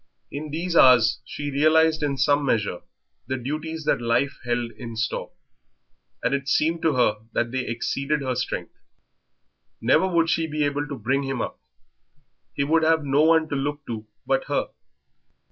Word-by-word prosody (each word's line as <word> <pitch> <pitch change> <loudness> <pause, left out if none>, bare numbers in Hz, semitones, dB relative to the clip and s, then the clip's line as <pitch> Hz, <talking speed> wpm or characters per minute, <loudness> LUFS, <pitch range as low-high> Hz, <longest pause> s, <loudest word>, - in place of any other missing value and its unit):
In 150 +2 -5
these 170 +3 -3
hours 120 -5 +6
she 145 0 -5
realised 155 +2 +3
in 140 -2 -1
some 145 +2 +3
measure 110 -9 0 0.5
the 130 - -2
duties 155 +5 -4
that - - +1
life 120 +4 0
held 120 -1 -1
in 115 -2 -9
store, 110 0 -3 0.9
and - - +1
it 140 -1 -2
seemed 165 +4 +1
to 160 - +2
her 120 -4 +3 0.2
that 120 0 0
they 130 0 -2
exceeded 140 +5 -1
her 130 -1 -1
strength. 125 +1 -4 1.1
Never 190 - +3
would 170 -3 +2
she 165 -1 +1
be 150 -1 -1
able 145 +1 -1
to 140 -2 -6
bring 135 +2 0
him 135 -2 -3
up - - -4 0.9
he 140 - -1
would 160 +3 +2
have 160 -1 +2
no 140 +1 +3
one 160 0 +4
to - - -2
look 145 +1 -3
to 110 -2 -6 0.2
but - - +1
her. - - -1
140 Hz, 170 wpm, -24 LUFS, 125-155 Hz, 1.1 s, hours